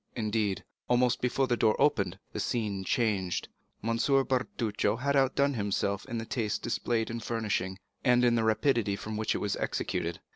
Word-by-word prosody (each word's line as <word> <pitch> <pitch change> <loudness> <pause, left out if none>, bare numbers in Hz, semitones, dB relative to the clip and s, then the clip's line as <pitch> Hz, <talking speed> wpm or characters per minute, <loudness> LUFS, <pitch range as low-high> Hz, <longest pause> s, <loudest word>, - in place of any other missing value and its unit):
Indeed, 105 -3 0 0.3
almost 125 0 +3
before 125 +2 +1
the 120 -1 +1
door 110 -1 +2
opened, 95 -10 +2 0.2
the - - -3
scene 105 -5 -1
changed. 95 -5 0 0.3
M. 115 +1 0
Bertuccio 125 -6 +1
had 140 +4 0
outdone 140 +1 +3
himself 100 -2 -1
in 115 - -3
the 115 - -3
taste 110 -3 -2
displayed 115 -1 -1
in 115 - -3
furnishing, 105 -5 -2 0.3
and 125 0 +4
in 120 - +4
the 115 -1 +2
rapidity 110 -1 +2
with 110 +2 -6
which 110 0 0
it - - +1
was 105 - -1
executed. 85 0 -2
115 Hz, 170 wpm, -30 LUFS, 105-125 Hz, 0.3 s, and